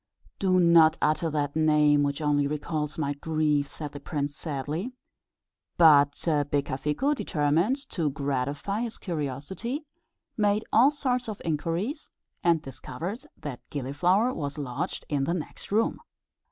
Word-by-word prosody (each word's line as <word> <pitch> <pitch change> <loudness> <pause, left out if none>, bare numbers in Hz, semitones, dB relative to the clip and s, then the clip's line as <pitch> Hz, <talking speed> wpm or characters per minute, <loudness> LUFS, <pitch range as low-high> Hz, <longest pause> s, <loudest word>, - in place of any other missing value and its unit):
"Do 185 -2 +3
not 170 -2 +6
utter 160 +2 +1
that 145 -1 -1
name, 150 -2 +4
which 145 +1 -1
only 145 -1 +2
recalls 150 0 -3
my 145 -3 -1
grief," 150 -1 0
said 150 0 -7
the 145 - -8
prince, 145 -2 -3
sadly; 155 - -4 0.8
but 145 -4 +7 0.4
Becafico, 145 - 0
determined 170 - 0
to 160 -5 0
gratify 140 - -2
his 235 -2 -4
curiosity, 175 - -4 0.5
made 210 0 +1
all 240 +5 +7
sorts 250 -5 -1
of 210 - -5
inquiries, 165 - -2 0.3
and 170 -3 +3
discovered 165 - -6
that 145 -5 -7
Gilliflower 175 - +1
was 145 -2 -4
lodged 130 -4 -4
in 140 -3 0
the 170 - 0
next 165 +2 -7
room. 220 +3 +1
155 Hz, 130 wpm, -27 LUFS, 145-190 Hz, 0.8 s, but